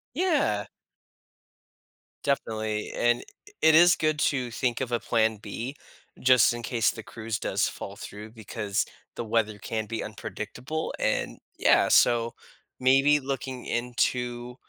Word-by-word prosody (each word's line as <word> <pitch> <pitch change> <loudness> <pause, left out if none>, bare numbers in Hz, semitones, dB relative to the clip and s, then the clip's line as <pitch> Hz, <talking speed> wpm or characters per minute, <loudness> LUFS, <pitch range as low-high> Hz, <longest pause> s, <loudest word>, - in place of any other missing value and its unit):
Yeah. 295 - +1 1.6
Definitely, 110 -6 -1
and 120 0 +2
i - - -9
i 415 - -19
it 160 0 +6
is 175 +2 +7
good 155 -1 0
to 130 -5 0
think 120 0 -1
of 125 -2 -3
a 120 - +2
plan 110 -1 +2
B 115 +6 -6 0.4
just 125 -2 +5
in 120 0 -6
case 115 -3 +1
the 110 - -9
cruise 110 -1 -4
does - - 0
fall 100 - -8
through 105 +1 -9
because 110 -1 -2 0.3
the - - -3
weather 110 -1 0
can 110 -1 -3
be 115 +1 -4
unpredictable, 120 +8 -5
and - - -1 0.2
Yeah, - - +4
so 115 -1 +4 0.5
maybe 135 +3 +5
looking 130 -2 -4
into 125 0 -1
120 Hz, 140 wpm, -27 LUFS, 110-130 Hz, 1.6 s, is